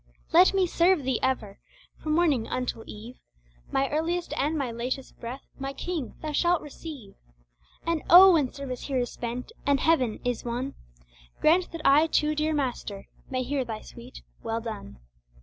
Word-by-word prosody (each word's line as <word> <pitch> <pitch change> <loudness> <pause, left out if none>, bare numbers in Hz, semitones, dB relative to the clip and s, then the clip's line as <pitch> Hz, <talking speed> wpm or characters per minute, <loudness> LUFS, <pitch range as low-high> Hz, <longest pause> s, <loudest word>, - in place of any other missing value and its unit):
Let 360 +3 +7
me 380 -1 +4
serve 345 -2 +3
Thee 260 -2 0
ever, 220 -6 -1 0.4
from 310 - -1
morning 300 -9 +2
until 250 -3 -3
eve, 225 +4 -10 0.5
My 270 0 +2
earliest 335 +3 -1
and 305 +3 0
my 265 -5 -2
latest 250 +3 -4
breath, 245 +4 -6 0.2
my 270 0 -4
King, 315 -2 -4
Thou 310 - -2
shall 345 +3 +2
receive. 290 -8 -9 0.7
And 335 -2 0
oh 370 +2 +10
when 290 -6 +2
service 265 -3 -6
here 275 -2 -1
is 245 -1 -1
spent, 245 - -5
and 280 -1 +2
Heaven 260 -8 +2
is 245 -2 -1
won 245 +3 -3 0.7
Grant 350 +4 +3
that 330 -2 -6
I 295 +4 +6
too, 300 -1 +2
dear 305 +1 0
Master, 245 -8 -3 0.2
may 255 -1 -1
hear 270 +1 -1
Thy 220 -3 -6
sweet 245 +2 -12 0.2
"Well 225 0 -2
done!" 215 - -7
275 Hz, 165 wpm, -27 LUFS, 245-315 Hz, 0.7 s, oh